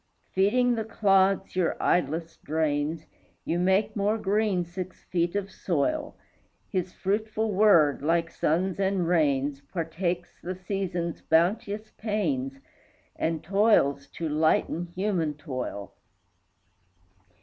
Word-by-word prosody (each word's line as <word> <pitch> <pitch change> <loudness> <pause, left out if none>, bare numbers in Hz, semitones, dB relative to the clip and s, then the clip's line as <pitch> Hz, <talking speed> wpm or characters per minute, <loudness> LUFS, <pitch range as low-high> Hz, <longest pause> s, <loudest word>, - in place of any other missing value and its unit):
Feeding 240 +6 +3
the 225 -2 -1
clods 195 -4 +2
your 180 -2 +1
idlesse 165 0 0
drains, 155 0 -1 0.4
You 170 - 0
make 190 +3 +2
more 210 +1 +1
green 205 -3 +1
six 185 +2 -7
feet 170 +1 -1
of 200 -1 -2
soil; 290 - -1 0.5
His 185 -2 -2
fruitful 215 +3 -1
word, 185 -8 +5
like 165 +2 +1
suns 180 +5 0
and 190 -3 +1
rains, 145 -4 +1
Partakes 175 +1 -3
the 185 +2 -4
seasons' 180 -3 -3
bounteous 200 +6 +1
pains, 150 - -1 0.6
And 160 -1 -1
toils 175 -7 +3
to 165 - -3
lighten 155 +2 +1
human 180 -6 0
toil. 130 - -5
180 Hz, 110 wpm, -27 LUFS, 160-200 Hz, 0.6 s, word